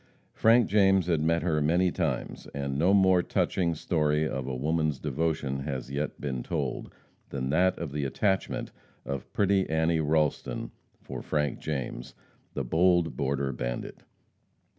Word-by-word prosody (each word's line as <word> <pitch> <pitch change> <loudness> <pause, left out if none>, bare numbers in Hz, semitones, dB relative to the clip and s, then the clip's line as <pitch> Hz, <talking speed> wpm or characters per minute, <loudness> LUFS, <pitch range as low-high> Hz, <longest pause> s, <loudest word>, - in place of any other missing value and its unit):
Frank 115 0 +4
James 95 -3 +4
had 85 -3 +1
met 85 +2 +1
her 80 -3 +1
many 85 +4 +3
times, 80 -9 -3
and 70 -1 -2
no 85 +7 +3
more 95 -2 +5
touching 85 -1 0
story 75 -1 +1
of 65 -3 -4
woman's 75 +3 0
devotion 75 -1 -1
has 65 -2 -4
yet 70 +2 -3
been 65 -4 -3
told; - - -3 0.4
than 65 -1 -3
that 90 +4 +3
of 85 -4 -5
the 75 0 -2
attachment 95 +8 -1 0.3
of 70 -2 -5
pretty 100 -1 +2
Annie 80 +1 +2
Ralston 75 -5 0 0.3
for - - -6
Frank 75 -3 -1
James, 65 -5 -4 0.4
the 70 - -1
bold 85 +5 +2
border 70 -1 -1
bandit. - - -5
75 Hz, 140 wpm, -28 LUFS, 70-85 Hz, 0.4 s, more